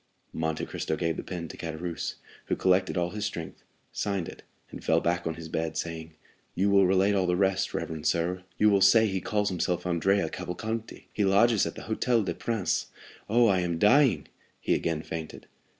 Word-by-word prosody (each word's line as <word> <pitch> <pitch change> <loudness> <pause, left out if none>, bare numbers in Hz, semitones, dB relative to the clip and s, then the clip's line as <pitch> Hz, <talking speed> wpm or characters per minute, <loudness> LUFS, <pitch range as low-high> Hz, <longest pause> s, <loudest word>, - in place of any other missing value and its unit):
Monte 80 -1 -2
Cristo - - -3
gave 85 0 -1
the - - -4
pen 85 -2 -5
to - - -8
Caderousse, 85 +1 -4 0.3
who - - 0
collected 95 0 +2
all 90 0 0
his 105 -1 -4
strength, 85 -6 -5 0.3
signed 100 -4 -2
it, - - -10 0.3
and - - -9
fell 80 0 +3
back 85 0 -1
on 80 - -2
his 80 0 -8
bed, 80 0 -3
saying: 80 -1 -5 0.4
"You 100 +2 +2
will 100 -2 +5
relate 95 +2 +3
all 95 -2 +1
the 90 - +2
rest, 95 0 +1
reverend 80 -2 -3
sir; 90 +2 0
you 105 0 +5
will 100 -1 +3
say 110 +4 +6
he 95 -3 -1
calls 105 -3 0
himself 90 -1 -1
Andrea 90 +3 +2
Cavalcanti. 110 +5 -5
He 105 - 0
lodges 100 +3 +4
at - - -6
the - - -8
Hôtel 115 0 +1
des - - -1
Princes. 115 -5 -1 0.4
Oh, 120 +2 +5
I 95 -4 +3
am 85 -2 -1
dying!" 130 - +4 0.3
He - - 0
again 80 -1 -1
fainted. 80 -1 -7
95 Hz, 195 wpm, -28 LUFS, 85-105 Hz, 0.4 s, say